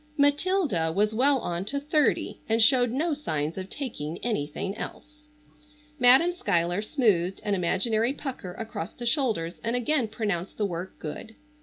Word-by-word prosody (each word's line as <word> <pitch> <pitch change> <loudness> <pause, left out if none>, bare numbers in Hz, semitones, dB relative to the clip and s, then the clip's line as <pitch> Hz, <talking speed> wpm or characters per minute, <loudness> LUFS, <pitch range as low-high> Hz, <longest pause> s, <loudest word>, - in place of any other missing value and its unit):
Matilda 285 - +2
was 210 +5 +1
well 270 +5 +4
on 175 +1 -2
to 280 +6 -2
thirty 300 +1 +1
and 225 +1 +2
showed 245 +1 +5
no 305 +7 0
signs 160 - -2
of 190 0 -6
taking 170 - -5
anything 195 -2 -2
else. 300 +6 -9 0.7
Madam 260 +8 +7
Schuyler 180 - 0
smoothed 205 - +1
an 205 - 0
imaginary 215 +6 +1
pucker 255 -10 -6
across 215 -5 -6
the 240 - -8
shoulders 230 - 0
and 230 +1 0
again 245 0 +1
pronounced 205 -5 -3
the 210 - +1
work 180 0 -5
good. 215 +8 -7
225 Hz, 150 wpm, -27 LUFS, 180-275 Hz, 0.7 s, Madam